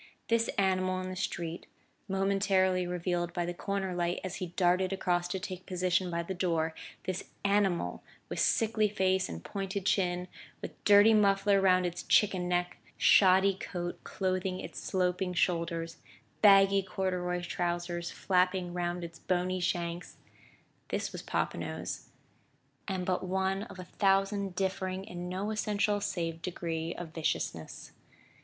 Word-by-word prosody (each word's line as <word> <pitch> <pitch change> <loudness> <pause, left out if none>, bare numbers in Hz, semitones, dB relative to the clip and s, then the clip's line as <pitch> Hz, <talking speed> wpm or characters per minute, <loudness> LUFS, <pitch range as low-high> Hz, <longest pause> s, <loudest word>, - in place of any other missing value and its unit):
This 230 0 +3
animal 185 -1 +1
in 185 0 -4
the 185 - -5
street, 170 -2 -4 0.4
momentarily 195 -2 +2
revealed 175 -1 -2
by 175 0 -1
the 175 - -3
corner 190 +1 -2
light 175 0 -1
as 185 -1 -4
he 185 - -3
darted 180 +1 +2
across 175 -2 0
to 190 +2 -3
take 185 -2 -7
position 185 0 +1
by 170 0 -2
the 190 - -4
door, 165 -3 0 0.3
this 185 -1 -3 0.2
animal 195 - +1 0.3
with - - -4
sickly 215 -1 +2
face 190 -2 +1
and 80 0 -7
pointed 195 -1 -4
chin, 180 -2 +1 0.3
with - - -9
dirty 205 +2 +7
muffler 200 -1 +4
round 185 -1 +4
its 175 +1 -3
chicken 185 -4 +3
neck, 180 0 0 0.2
shoddy 190 0 +6
coat 175 -2 -5
clothing 185 -1 -2
its - - -7
sloping 180 -1 0
shoulders, 170 -1 0 0.4
baggy 195 -1 +7
corduroy 180 -2 -2
trousers 175 -1 -2
flapping 180 -1 +1
round 175 0 -2
its 170 0 -8
bony 185 0 0
shanks 175 -1 -2 0.7
this - - -2
was - - -6
Popinot's, - - -3 0.8
and 190 -2 -2
but 185 0 0
one 190 +1 0
of 205 - -11
a 185 - -6
thousand 195 0 +1
differing 190 0 -2
in 180 -2 -6
no 195 +4 -2
essential 210 -1 0
save 165 -4 -2
degree 165 -2 -3
of 175 -2 -6
viciousness. 160 -2 -3
185 Hz, 140 wpm, -31 LUFS, 175-195 Hz, 0.8 s, dirty